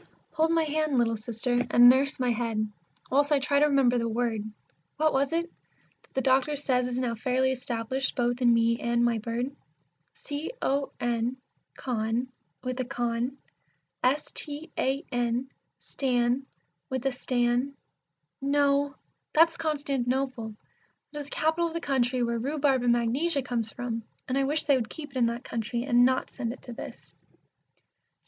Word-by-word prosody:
Hold 320 0 +2
my 330 0 +3
hand, 310 -2 0
little 230 -1 +2
Sister, 235 +3 -1
and 240 0 +8
nurse 265 +2 +4
my 250 -1 +2
head, 225 -2 -1 0.4
whilst 285 +3 +3
I 295 - +6
try 280 +1 +2
to 300 - +5
remember 265 -4 +3
the 230 0 -1
word, 230 -1 0 0.6
What 310 +1 +3
was 270 +2 +2
it? 335 +1 +1
that 340 - -31
the 265 - +2
doctor 265 +3 +3
says 255 -3 +1
is 250 0 -3
now 250 -2 0
fairly 255 +3 +1
established 255 +1 -2
both 245 0 0
in 240 -1 +5
me 230 0 +3
and 235 0 +1
my 235 -2 +1
bird. 240 +5 -3 0.6
C 290 +2 -5
O 275 +1 0
N 240 +1 0 0.4
con, 235 0 -1 0.3
with 255 0 -3
a - - +1
con, 245 0 -2 0.7
S 280 +4 +1
T 300 +1 -7
A 270 +2 0
N 245 +1 -1 0.3
stan, 250 0 0 0.4
with 260 -1 -3
a 270 - +3
stan 245 +2 0 0.7
No! 280 0 +2 0.4
That's 330 +2 +5
Constantinople, 270 -7 -1 0.6
that 295 - -6
is 290 - -5
The - - -12
capital 320 +3 +1
of 330 - -7
the - - 0
country 255 -4 +1
where 235 0 0
rhubarb 275 0 +1
and 240 -1 +3
magnesia 270 +6 +1
comes 230 -3 -2
from, 235 -2 -4 0.3
and 255 - -1
I 275 0 +2
wish 300 +3 +2
they 280 -2 +4
would 225 -4 -3
keep 300 -2 -8
it 270 - -6
in 240 -2 +4
that 235 +1 -3
country, 235 +1 -3
and 245 -2 +4
not 260 +1 +2
send 235 -3 -3
it - - -15
to 245 - -7
this. - - -10
255 Hz, 170 wpm, -28 LUFS, 240-280 Hz, 0.7 s, and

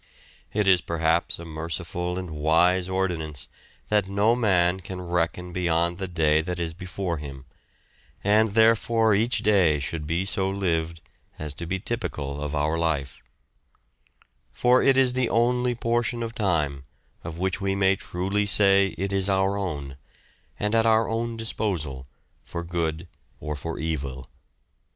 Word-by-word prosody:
It 105 -1 0
is 90 -2 +5
perhaps 85 0 0
a 85 - -9
merciful 85 +2 -4
and 90 -3 -5
wise 85 +4 +2
ordinance 85 -7 -2 0.4
that 105 -3 +2
no 105 +4 +3
man 95 -6 +2
can 95 0 -7
reckon 90 0 -2
beyond 85 0 0
the 95 - -3
day 80 -3 +2
that 90 +2 -4
is 85 -1 -2
before 90 0 -4
him, 70 -2 -8 0.8
and 105 +1 +3
therefore 115 0 +4
each 115 +5 +1
day 95 -8 +4
should 75 +2 -4
be 85 +4 0
so 95 0 0
lived 85 -4 -1 0.4
as 75 -2 -5
to 85 +3 -6
be 95 - -1
typical 75 - -4
of 75 +1 -3
our 75 +3 0
life; 75 -5 -2 1.3
for 125 +1 +3
it 135 -1 +4
is 130 -2 +4
the 125 -2 0
only 125 +1 +2
portion 120 0 -1
of 115 0 -5
time 75 - 0 0.4
of 80 -1 -7
which 95 +2 -1
we 95 0 0
may 95 0 +3
truly 95 +3 -2
say 100 -1 +4
it 100 +3 -2
is 95 0 +1
our 95 0 +2
own, 75 -9 -4 0.6
and 105 +1 0
at 115 0 +4
our 110 0 +4
own 115 +1 -2
disposal 85 - -3 0.4
for 85 - -6
good 85 -1 -3 0.3
or 75 -1 -4
for 80 +3 -5
evil. 70 -5 -4
90 Hz, 150 wpm, -25 LUFS, 80-105 Hz, 1.3 s, is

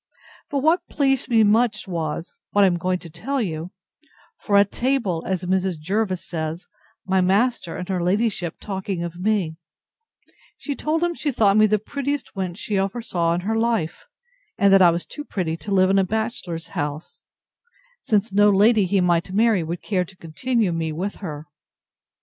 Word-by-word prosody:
But 280 -4 -1
what 345 +3 +2
pleased 270 -3 +1
me 225 -2 +5
much 215 0 +2
was, 165 -2 -4 0.2
what 205 - +3
I - - +7
am 180 -2 +2
going 185 +1 0
to 170 - -11
tell 270 - -3
you; 165 -6 -3 0.7
for 200 -2 +2
at 200 0 +4
table, 235 -10 0
as 185 -1 -2
Mrs. 185 -1 0
Jervis 185 +2 -1
says, 160 +1 -4 0.4
my 190 0 +2
master 195 0 +1
and 180 - -5
her 185 -2 -1
ladyship 185 -2 0
talking 190 -3 -4
of 170 0 -6
me, 185 -5 0 1.0
she 290 - -4
told 315 +4 -1
him 345 0 +1
she 300 -3 -2
thought 205 -5 +3
me 215 0 +6
the 215 0 +2
prettiest 280 +6 -4
wench 185 -3 -4
she 205 -2 -1
ever 195 +5 -2
saw 170 -5 0
in 175 - -2
her 215 +4 -1
life; 225 -8 -1 0.5
and 200 -1 +4
that 195 - +7
I 175 - +8
was 170 +1 -1
too 295 - -7
pretty 180 - -2
to 200 +6 -7
live 190 -1 +4
in 195 - +4
a - - +4
bachelor's 200 -5 -3
house; 145 +2 -5 0.8
since 210 -1 0
no 205 +1 +5
lady 205 +1 +4
he 195 +1 +2
might 175 0 +1
marry 215 -1 +3
would 165 +2 -5
care 185 -3 0
to 190 +2 -16
continue 210 +6 -1
me 165 -1 -2
with 185 +6 -4
her. 155 -6 -7
195 Hz, 185 wpm, -23 LUFS, 175-220 Hz, 1.0 s, I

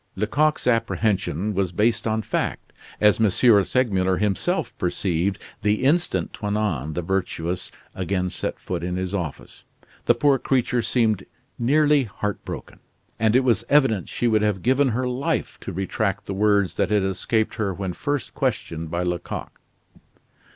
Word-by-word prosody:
Lecoq's 135 +10 +1
apprehension 105 -5 0
was 95 -2 0
based 110 +3 +1
on 110 0 0
fact, - - -3 0.3
as 105 +1 +4
M, 110 - +5
Segmuller 100 -3 +3
himself 100 -2 -1
perceived 90 +1 0 0.2
the 105 +3 +1
instant 135 - +1
Toinon 100 - -2
the 90 - -2
Virtuous 90 -1 -2 0.2
again 90 -1 -1
set - - -2
foot - - -4
in 90 0 -2
his 95 +1 -3
office. 85 -7 -5 0.4
The 120 - +4
poor 140 +2 +3
creature 125 -2 +1
seemed 110 -5 +1 0.3
nearly 145 +2 +3
heartbroken, 105 -1 -5 0.4
and 110 +1 +3
it 130 - +5
was 115 -6 +2
evident 135 - +3
she 120 - -1
would 110 -2 +3
have 105 -4 0
given 130 +3 +3
her 125 +2 -1
life 125 +2 -2
to - - -6
retract 95 +2 -2
the 100 - -4
words 100 -1 +2
that 100 -2 +1
had 105 -2 +2
escaped 110 +3 0
her 105 -3 0
when 95 -1 -4
first 145 - -3
questioned 80 0 -2
by 85 +2 -1
Lecoq. 90 -1 -4
105 Hz, 150 wpm, -23 LUFS, 95-120 Hz, 0.4 s, M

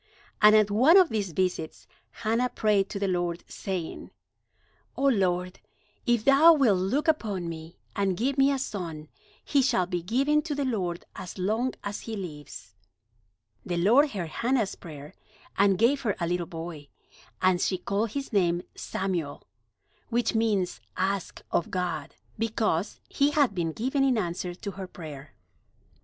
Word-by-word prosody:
And 210 0 +8
at 210 -1 +4
one 260 - +6
of 370 -4 +6
these 205 -5 -2
visits 180 -2 -2 0.2
Hannah 230 +3 0
prayed 210 -4 +1
to - - -4
the 200 0 -1
Lord, 175 -2 -1
saying: 185 -4 -5 0.9
"O - - -2
Lord, 185 -8 +1 0.5
if 240 -2 +2
thou 290 +5 +8
wilt 240 - +3
look 260 - 0
upon 210 - 0
me, 165 0 -8 0.2
and 195 -3 0
give 265 +5 0
me 275 0 +4
a 275 - +1
son, 170 - -5 0.4
he 280 - +3
shall 190 -8 +2
be 175 -1 -3
given 270 - +2
to 300 -1 -4
the 285 -1 -1
Lord 185 -9 -2
as 185 0 -8
long 220 +7 0
as 205 0 -4
he 225 - -6
lives." 150 - -8 0.9
The 175 - -3
Lord 240 - +5
heard 185 -9 -4
Hannah's 235 +1 0
prayer, 150 -3 -10 0.4
and 200 -1 +4
gave 250 +7 +3
her 210 -6 0
a 170 - 0
little 175 0 -1
boy, 165 -4 -7 0.5
and 185 -1 +3
she 185 - +1
called 205 +4 -2
his 275 -3 -4
name 175 -3 +2
Samuel, 175 -7 -3 0.7
which 240 0 +1
means 215 -5 0 0.2
"Asked 190 0 -2
of 170 - 0
God"; 175 -5 -3 0.2
because 220 -5 -1
he 280 +1 +2
had 285 -6 +2
been 170 -3 -1
given 265 - 0
in 260 -3 +3
answer 175 -2 -3
to 200 +2 -6
her 190 0 -7
prayer. 150 -5 -10
195 Hz, 160 wpm, -27 LUFS, 175-240 Hz, 0.9 s, And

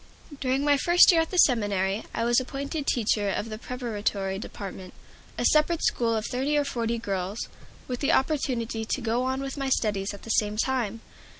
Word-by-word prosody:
During 265 +1 0
my 290 -1 +4
first 345 +7 +6
year 330 -2 +4
at 325 - -2
the 370 - -4
seminary 205 - +2
I 230 - -2
was 240 +1 +4
appointed 280 +3 -4
teacher 210 -3 +1
of 215 +3 -2
the 215 0 -6
Preparatory 205 -6 -3
Department, 190 -3 -8 0.4
a - - -1
separate 310 +2 +3
school 230 -1 +1
of 220 0 -2
thirty 275 +4 0
or 290 - +2
forty 235 -3 -1
girls, 195 -1 -3 0.4
with 250 -1 -3
the 285 +2 +1
opportunity 250 -7 0
to 225 - -2
go 235 0 0
on 260 +1 -1
with 275 +1 -5
my 275 -1 -2
studies 205 -6 0
at 200 - -11
the 225 - -4
same 210 -1 +1
time. 230 -3 -1
235 Hz, 190 wpm, -26 LUFS, 210-275 Hz, 0.4 s, first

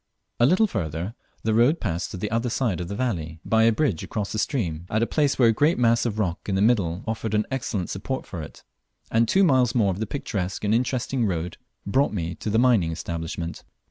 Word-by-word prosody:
A 120 - +6
little 185 +8 +4
further 85 - -3 0.3
the 110 - +1
road 120 +9 +4
passed 85 +1 -2
to - - -6
the 105 +3 -3
other 115 +2 0
side 115 -7 0
of 85 - -4
the 100 - -4
valley 85 -10 -2
by 110 0 +4
a 115 - +6
bridge 110 - 0
across 105 -2 -4
the 110 - -2
stream 90 - -2
at 110 +2 +1
a - - +3
place 145 +2 +1
where 120 -3 +5
a - - +4
great 150 +9 +2
mass 115 0 +3
of 110 -2 -3
rock 95 -2 -2
in 95 - 0
the 95 - +1
middle 100 -6 +2
offered 110 -1 -2
an 105 - +2
excellent 110 -8 -2
support 125 +8 -4
for 90 - -6
it, 75 - -11 0.5
and 115 +1 +3
two 195 - +4
miles 130 -8 +3
more 105 -5 +3
of 95 - -5
most 110 - -3
picturesque 100 -9 -3
and 105 +1 +2
interesting 125 0 0
road 85 -2 -3 0.3
brought 135 +7 +2
me 85 -4 -2
to 100 - -5
the 110 - +2
mining 115 -9 +4
establishment. 80 +1 -5
110 Hz, 230 wpm, -25 LUFS, 90-120 Hz, 0.5 s, A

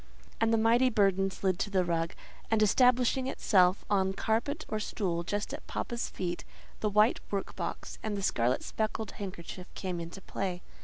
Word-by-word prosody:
And 225 0 +3
the 225 - +4
mighty 235 +3 +4
burden 195 -3 +3
slid 190 -1 -1
to 205 - 0
the 190 -3 +2
rug, 165 -1 -1 0.3
and 220 -1 +3
establishing 250 +3 +4
itself 185 -7 +3
on 190 -2 +2
carpet 240 +10 -1
or 215 - -2
stool 185 -5 -1
just 205 +4 -3
at - - -7
"papa's" 235 0 -3
feet, 175 -1 -3 0.4
the 215 - +1
white 210 +3 +4
work 200 -1 -3
box - - -5
and 215 -2 -2
the 200 - -3
scarlet 125 -7 +1
speckled 220 -1 -2
handkerchief 180 -2 -7
came 185 -3 -3
into 170 +3 -7
play. 185 -1 -4
200 Hz, 170 wpm, -30 LUFS, 185-225 Hz, 0.4 s, the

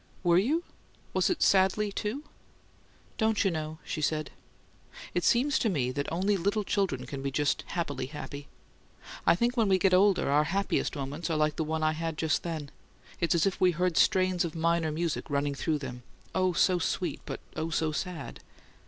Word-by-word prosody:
"Were 175 -1 +5
you? 300 - +1 0.5
Was - - +2
it 365 - +1
'sadly,' 200 +2 +3
too?" 215 +8 -3 1.0
"Don't 220 -1 +2
you 195 - +3
know?" 155 -1 -4
she 155 - -4
said. 155 0 -1 0.8
"It 175 - 0
seems 270 +4 +3
to 225 - +1
me 130 -9 0
that 140 +2 -3
only 195 +5 +1
little 200 +4 0
children 190 -11 -1
can 135 +2 -6
be 140 - -1
just 145 +2 0
happily 145 -7 -3
happy. 145 0 -8 0.8
I - - +7
think 240 +6 +1
when 225 -4 +2
we 190 - +5
get 185 0 +3
older 195 +1 +4
our 150 +1 +4
happiest 195 +2 0
moments 145 +4 -4
are 160 - 0
like 155 0 +1
the 160 - -1
one 160 0 -2
I 155 - +3
had 160 0 -3
just 160 -3 +1
then: 155 -4 -5 0.5
it's 170 -1 +2
as 170 - +3
if 195 - -1
we 185 - +6
heard 180 0 0
strains 185 0 +3
of 170 -2 -4
minor 165 -1 +1
music 165 +1 -2
running 140 0 0
through 155 +2 -1
them 125 -3 -7 0.3
oh, 185 -1 +2
so 180 +1 +3
sweet, 175 +2 -2
but - - -4 0.2
oh, 160 +1 -2
so 160 0 0
sad!" 180 +2 -5
170 Hz, 190 wpm, -29 LUFS, 155-190 Hz, 1.0 s, I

